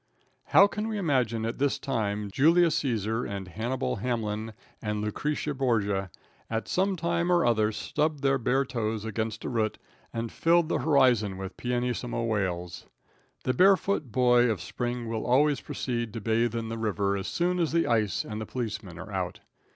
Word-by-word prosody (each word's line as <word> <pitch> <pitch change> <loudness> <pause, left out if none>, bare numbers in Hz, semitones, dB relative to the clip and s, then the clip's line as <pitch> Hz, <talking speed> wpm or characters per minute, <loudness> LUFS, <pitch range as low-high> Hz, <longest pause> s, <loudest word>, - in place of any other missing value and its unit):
How 200 - +7
can 210 +2 -3
we 220 -1 -2
imagine 125 - +1
at 115 +3 -3
this 140 0 +2
time 105 -5 -2
Julius 165 - +4
Caesar 115 -3 -1
and 100 -2 -5
Hannibal 110 - -2
Hamlin 110 -1 -2 0.3
and 105 -1 -2
Lucretia 150 +8 -2
Borgia 105 -8 0 0.4
at 115 0 -2
some 190 +1 +1
time 170 +1 0
or 175 -1 +4
other 110 -2 +3
stubbed 150 +5 -1
their 135 -1 +3
bare 135 +3 +1
toes 110 -3 -2
against 110 0 -3
a - - -2
root 110 -3 0 0.3
and 115 0 -4
filled 170 0 +3
the - - +1
horizon 120 -10 +3
with 95 0 -6
pianissimo 125 -1 -2
wails. 90 -6 -2 0.6
The 130 - +1
barefoot 185 - +3
boy 125 0 +4
of 110 - -1
spring 120 -1 -4
will 115 -1 -2
also 140 +3 +3
proceed 120 -3 -3
to 115 - -4
bathe 115 +2 +1
in 115 -1 -3
the 115 0 -4
river 100 -2 0
as 95 -1 -3
soon 180 +1 0
as 165 -3 +1
the 165 +1 +2
ice 110 -4 +1
and 110 0 -5
the 110 - -5
policeman 110 -8 -5
are - - -8
out. - - -3
115 Hz, 175 wpm, -28 LUFS, 110-140 Hz, 0.6 s, How